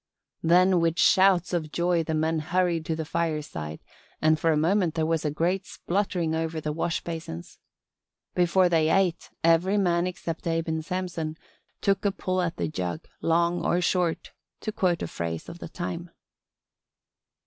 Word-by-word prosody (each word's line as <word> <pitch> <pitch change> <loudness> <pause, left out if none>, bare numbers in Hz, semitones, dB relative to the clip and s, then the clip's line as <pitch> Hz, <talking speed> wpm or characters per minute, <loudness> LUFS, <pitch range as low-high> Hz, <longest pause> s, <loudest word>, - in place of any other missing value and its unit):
Then 180 +2 +5
with 165 0 +1
shouts 190 -3 +4
of 160 -3 -1
joy 175 0 +1
the 160 0 -2
men 160 +1 +1
hurried 170 0 0
to 160 - 0
the 160 0 -4
fireside 150 - -3 0.4
and 155 0 +3
for 165 - +3
a 155 - +2
moment 170 +1 +2
there 160 -1 +1
was 160 -1 0
a 150 - +1
great 175 +6 -1
spluttering 175 -4 -1
over 160 0 -2
the 150 -1 -3
wash 165 +1 -1
basins. 160 - -7 0.7
Before 180 +1 +4
they 160 -2 +3
ate 180 -1 +1
every 165 +5 +4
man 175 -2 +2
except 170 -2 -5
Abe 165 0 0
and 160 0 -1
Samson 165 -3 -3 0.4
"took 195 -1 +1
a 200 - +2
pull 185 -1 -1
at 175 -1 -2
the - - -1
jug 120 - -3 0.2
long 170 +1 +2
or 175 - +2
short" 180 -1 0 0.3
to 215 - -3
quote 180 -5 0
a - - -2
phrase 80 -1 -4
of 175 - -9
the - - -7
time. 175 0 -5
170 Hz, 170 wpm, -26 LUFS, 160-180 Hz, 0.7 s, Then